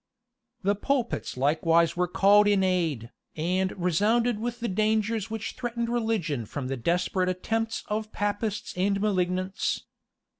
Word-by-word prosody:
[*] 245 -1 -49
The 200 +2 +3
pulpits 240 - -2
likewise 165 +4 +3
were 180 0 +1
called 205 +3 +5
in 200 -2 +3
aid, 165 -11 0 0.2
and 185 +4 0
resounded 210 +7 +2
with 240 +1 -3
the 235 - -2
dangers 215 +1 0
which 225 0 -4
threatened 235 -2 -3
religion 220 - -1
from 130 +1 -5
the 135 - -1
desperate 180 +7 0
attempts 225 +5 -2
of 215 +1 -3
Papists 205 +1 -2
and 195 +2 +1
malignants. 185 -2 0
200 Hz, 140 wpm, -27 LUFS, 180-225 Hz, 0.2 s, called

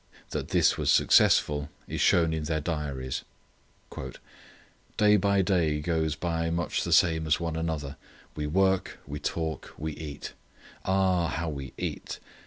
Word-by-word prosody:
That - - -3
this - - +3
was - - +2
successful 75 -1 +4 0.2
is - - -3
shown 80 -2 +4
in 80 -1 -2
their 80 0 0
diaries. 70 -5 -3 1.7
"Day 105 0 +5
by 100 0 +2
day 85 -6 +1
goes 80 0 0
by 80 0 -1
much 85 +1 -1
the - - -3
same 80 -2 +4
as 75 - +2
one 85 -2 -3
another. 80 -3 -3 0.4
We 75 -1 -3
work; 95 +3 +1
we 75 +1 -6
talk; 80 -3 -4
we 80 +1 -3
eat. 75 -1 -7 0.5
Ah, 95 -2 +2
how 85 +1 -2
we 70 -3 -6
eat! - - -4
80 Hz, 145 wpm, -28 LUFS, 75-85 Hz, 1.7 s, Day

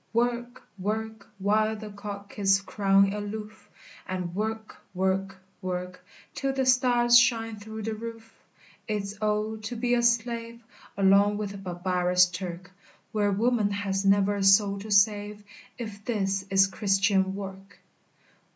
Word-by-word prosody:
work 240 +1 -1 0.7
While 215 +2 +1
the 215 -1 -8
cock 200 0 -8
is 195 0 +3
crowing 195 0 +2
aloof! 210 +1 -7 0.4
And 180 -2 -4
work 220 +2 -4 0.2
work 190 +1 0 0.3
work 180 -1 -5 0.3
Till 275 -1 -1
the 265 -1 0
stars 245 -2 +5
shine 225 -2 +1
through 220 +1 -8
the 220 +1 -2
roof! 225 0 -9 0.4
It's, 205 -2 -3
O, 215 +1 0
to 220 +3 -6
be 240 +1 0
a 240 - +3
slave 235 0 0 0.4
Along 200 +1 +4
with 205 -1 -4
the 200 - -8
barbarous 180 -1 +2
Turk, 180 0 -7 0.4
Where 205 -2 +1
woman 220 +1 +1
has 200 -1 -2
never 200 +1 +3
a 200 - -1
soul 195 0 +4
to 215 +2 -9
save, 205 0 +2 0.3
If 215 -4 -7
this 195 -4 -1
is 195 0 +5
Christian 195 -1 +1
work! 195 0 -9
205 Hz, 135 wpm, -27 LUFS, 195-220 Hz, 0.7 s, stars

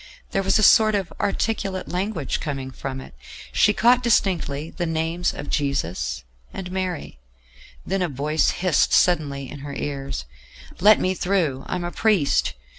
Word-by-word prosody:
There 195 - +1
was 195 +1 +3
a 215 - +2
sort 215 +1 +6
of 195 -3 -2
articulate 200 -2 -1
language 180 -5 -2
coming 135 -3 -4
from 130 0 -6
it; 130 - -11 0.4
she 210 - +4
caught 240 +4 +4
distinctly 170 - 0
the 175 -2 -3
names 165 +2 -1
of 145 - -7
Jesus 80 - -1 0.3
and 180 -1 -7
Mary; 185 - -4 0.7
then 195 0 -1
a 180 - 0
voice 150 +3 +1
hissed 180 -4 +1
suddenly 145 -6 +2
in 145 - -9
her 140 0 -7
ears: 135 - -4 0.5
"Let 210 +3 +6
me 185 - +1
through. 175 -8 -1
I - - -2
am 180 - -3
a 175 - -3
priest." 145 - +2
170 Hz, 160 wpm, -23 LUFS, 140-195 Hz, 0.7 s, sort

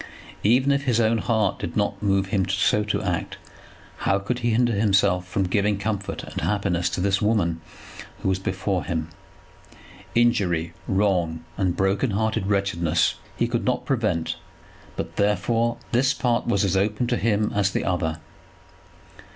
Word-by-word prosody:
Even 125 +6 +4
if 140 0 0
his 120 -3 +2
own 115 0 +3
heart 110 -2 0
did - - -4
not 100 -1 0
move 95 -2 +1
him 95 -2 0
so 100 +2 +2
to 105 - -1
act, - - -2 0.6
how 95 - +1
could 110 +5 -3
he 120 -1 0
hinder 120 +1 +2
himself 100 -3 +2
from 95 +2 0
giving 100 +2 +1
comfort 100 0 -3
and - - -6
happiness 100 -4 0
to - - -3
this 100 +1 +1
woman 95 -7 +1 0.6
who - - +1
was 95 0 +1
before 95 0 -2
him? 80 -2 -3 1.1
Injury, 90 -9 +2
wrong, 90 -5 +1
and 95 -3 0
broken 95 +6 +1
hearted 110 0 0
wretchedness, 95 -5 +1 0.2
he 120 - +1
could 120 0 -1
not 125 -1 0
prevent; 110 - 0 0.6
but, - - -5
therefore, 115 +4 +1
this 130 +4 +2
part 120 -2 0
was 100 -4 +2
as 95 -1 0
open 105 +5 +1
to 120 0 0
him 105 -2 +1
as 100 -1 +2
the - - -2
other. 80 -3 -1
100 Hz, 160 wpm, -24 LUFS, 95-115 Hz, 1.1 s, Even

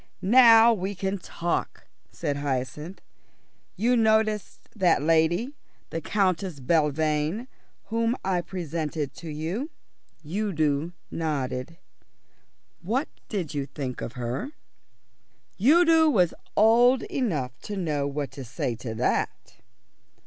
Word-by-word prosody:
"Now 230 +1 +7
we 200 -1 -3
can 190 +1 -2
talk," 170 -1 -3 0.3
said 145 -4 -3
Hyacinth. 145 +5 -4 0.7
"You 240 +4 +2
noticed 220 -2 +1
that 180 -8 +3
lady, 165 - +2 0.4
the 165 - -3
Countess 185 -4 0
Belvane, 155 - +1 0.4
whom 230 +1 +1
I 185 -2 +1
presented 160 -5 -4
to 165 - -8
you?" 165 - -3 0.6
Udo 160 -4 -1 0.2
nodded. 145 -2 -3 1.0
"What 240 - -1 0.2
did 180 -8 -3
you 140 -2 -2
think 130 -3 -5
of 120 - -5
her?" 125 - -4 1.1
Udo 325 - +6
was 180 - +3 0.2
old 240 +4 +5
enough 155 - -2
to 205 - -6
know 150 -6 -1
what 145 0 -3
to 135 - -8
say 125 0 -3
to 110 -2 -6
that. - - -2
170 Hz, 110 wpm, -26 LUFS, 150-220 Hz, 1.1 s, Now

